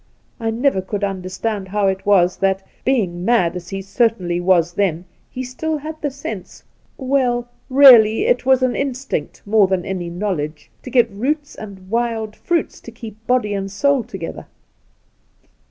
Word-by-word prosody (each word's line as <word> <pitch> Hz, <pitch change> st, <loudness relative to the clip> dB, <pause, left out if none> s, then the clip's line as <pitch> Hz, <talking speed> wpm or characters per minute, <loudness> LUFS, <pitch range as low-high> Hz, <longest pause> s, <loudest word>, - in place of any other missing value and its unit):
I 225 Hz, -1 st, -1 dB
never 230 Hz, -2 st, +1 dB
could 200 Hz, +2 st, -4 dB
understand 195 Hz, +2 st, -3 dB
how 205 Hz, +1 st, 0 dB
it 190 Hz, +1 st, -1 dB
was 185 Hz, -3 st, +4 dB
that, 195 Hz, 0 st, 0 dB, 0.2 s
being 190 Hz, -10 st, 0 dB
mad 185 Hz, -6 st, +2 dB
as 175 Hz, -1 st, -7 dB
he 195 Hz, 0 st, -5 dB
certainly 195 Hz, -5 st, 0 dB
was 175 Hz, -2 st, +2 dB
then, 180 Hz, -3 st, 0 dB, 0.2 s
he 255 Hz, -, -6 dB
had 255 Hz, -, -5 dB
still 310 Hz, +3 st, -3 dB, 0.2 s
the 290 Hz, -, 0 dB
sense 225 Hz, -8 st, -8 dB, 0.2 s
— -, -, -38 dB
well, 255 Hz, -3 st, 0 dB, 0.2 s
really 250 Hz, -, +7 dB
it -, -, +2 dB
was 260 Hz, 0 st, +3 dB
an 255 Hz, -1 st, +1 dB
instinct 265 Hz, -, -3 dB
more 210 Hz, -1 st, +4 dB
than 185 Hz, -2 st, -1 dB
any 180 Hz, -3 st, -4 dB
knowledge 170 Hz, -5 st, -4 dB
— -, -, -38 dB
to -, -, -8 dB
get 245 Hz, -2 st, +4 dB
roots 290 Hz, +8 st, -2 dB
and 195 Hz, -3 st, -10 dB
wild 225 Hz, -1 st, -2 dB
fruits 340 Hz, -3 st, -2 dB
to 235 Hz, -, -10 dB
keep 220 Hz, -1 st, -11 dB
body 245 Hz, -5 st, +1 dB
and 195 Hz, -1 st, -3 dB
souL 275 Hz, +5 st, +2 dB
together 190 Hz, -5 st, -7 dB
210 Hz, 170 wpm, -19 LUFS, 190-250 Hz, 0.2 s, really